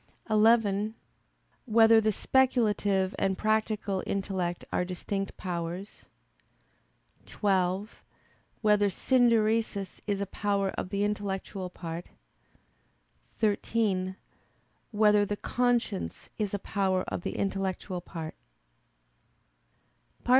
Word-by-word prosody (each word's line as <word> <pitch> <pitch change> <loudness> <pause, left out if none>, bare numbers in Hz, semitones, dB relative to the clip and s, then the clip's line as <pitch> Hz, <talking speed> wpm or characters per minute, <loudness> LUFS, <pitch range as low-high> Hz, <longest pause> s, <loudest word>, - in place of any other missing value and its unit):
(11) 215 -1 +3 0.7
Whether 225 -1 +6
the 215 0 +2
speculative 210 -6 +2
and 190 -1 +1
practical 215 -2 0
intellect 190 -3 -2
are - - +2
distinct 195 +2 -4
powers? 175 +2 -5 1.2
(12) 195 0 0 0.6
Whether 210 -1 +4
"synderesis" 225 -3 +2
is 200 -1 0
a 200 - -1
power 200 0 -1
of - - -5
the 200 +1 0
intellectual 200 -2 -3
part? 170 -1 -6 1.3
(13) 205 -3 0 0.7
Whether 210 -1 +4
the 205 0 -2
conscience 240 -5 -1
is 210 -2 0
a - - 0
power 190 -2 0
of - - -4
the - - -4
intellectual 190 -2 -2
part? 165 -3 -7
200 Hz, 90 wpm, -29 LUFS, 190-215 Hz, 1.3 s, Whether